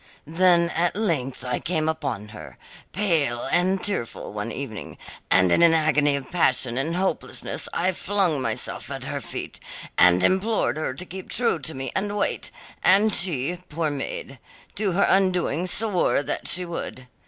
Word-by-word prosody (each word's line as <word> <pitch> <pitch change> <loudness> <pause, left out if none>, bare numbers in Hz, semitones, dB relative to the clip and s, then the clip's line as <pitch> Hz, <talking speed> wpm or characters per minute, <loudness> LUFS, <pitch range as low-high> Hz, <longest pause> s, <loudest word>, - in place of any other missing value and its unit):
Then 170 +1 +3
at 175 +1 0
length 150 - -2
I 125 -1 -1
came 155 -2 -1
upon 125 -10 -3
her, 105 - -11 0.3
pale 160 -13 0
and 185 +2 +2
tearful, 155 - -3
one 105 +2 -4
evening, 125 -7 -7 0.3
and 95 -1 +4
in - - +4
an 170 -1 +6
agony 150 -2 +3
of 135 -2 -6
passion 130 -8 +3
and 150 +6 -1
hopelessness 190 +1 -2
I 185 +2 +1
flung 185 -5 0
myself - - -3
at - - -5
her - - -4
feet, - - -7 0.4
and 90 +1 +6
implored 190 - +1
her 155 -4 -3
to 180 - -2
keep 190 +1 -9
true 240 -9 0
to 135 - -3
me 135 0 -4
and 205 +2 -1
wait, 200 - -1 0.3
and 205 +3 +5
she, 175 -2 +2
poor 155 0 -1
maid, 135 -2 -6 0.3
to 200 -3 -1
her 200 +3 +3
undoing 180 -3 +1
swore 190 -6 +2
that - - -3
she 180 +1 +2
would. 165 -6 -6
165 Hz, 165 wpm, -24 LUFS, 135-185 Hz, 0.4 s, an